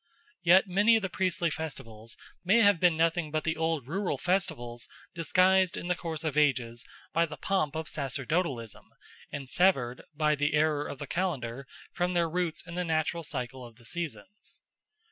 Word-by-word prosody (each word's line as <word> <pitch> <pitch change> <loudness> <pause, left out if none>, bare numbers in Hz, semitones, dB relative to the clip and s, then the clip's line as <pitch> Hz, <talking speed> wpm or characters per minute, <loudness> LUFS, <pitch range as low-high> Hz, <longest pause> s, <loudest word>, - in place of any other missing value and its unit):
Yet 185 +3 +6
many 205 +5 +5
of 220 - +1
the 190 - -2
priestly 180 -3 +1
festivals 115 -8 -5 0.3
may 205 +6 +5
have 200 -4 +5
been 175 -2 +4
nothing 165 0 +2
but 155 +1 -1
the 165 0 0
old 160 -4 0
rural 190 +5 -1
festivals 160 -11 -1 0.3
disguised 185 +2 +3
in 175 - -5
the 180 - +2
course 165 -3 -4
of 155 -3 -1
ages 125 -6 +2 0.3
by 165 +1 +3
the 150 -1 -8
pomp 155 -2 0
of 160 0 -3
sacerdotalism 140 - -2 0.4
and 140 -2 -5
severed, 135 -7 +2
by 150 0 +3
the 145 0 +1
error 150 -1 +2
of 140 - -6
the - - -5
calendar, 135 -8 -2 0.2
from 175 +1 -1
their 170 -1 +3
roots 170 -1 -2
in 175 - -9
the 180 +1 -1
natural 160 0 0
cycle 130 -4 -4
of 120 -2 -11
the 120 0 -19
seasons. 170 - -5
160 Hz, 175 wpm, -29 LUFS, 140-180 Hz, 0.4 s, Yet